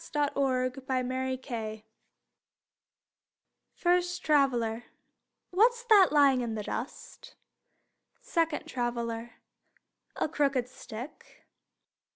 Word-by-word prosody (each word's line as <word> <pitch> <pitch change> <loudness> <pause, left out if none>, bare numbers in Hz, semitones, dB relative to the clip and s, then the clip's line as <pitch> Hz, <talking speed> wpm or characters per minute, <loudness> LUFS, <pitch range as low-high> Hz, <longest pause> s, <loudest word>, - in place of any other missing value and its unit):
THE 290 -1 +1
CROOKED 255 -1 0
STICK 255 -4 -3 1.9
First 355 0 +1
Traveler: 245 -6 +2 0.7
What's 470 +6 +3
that 400 -4 +7
lying 280 -3 +5
in 230 -2 -3
the 210 - -4
dust? 240 +5 -7 0.8
Second 330 -3 -1
Traveler: 235 -1 -3 0.8
A - - 0
crooked 275 -5 0
stick. 250 +1 -10
260 Hz, 80 wpm, -29 LUFS, 240-300 Hz, 1.9 s, that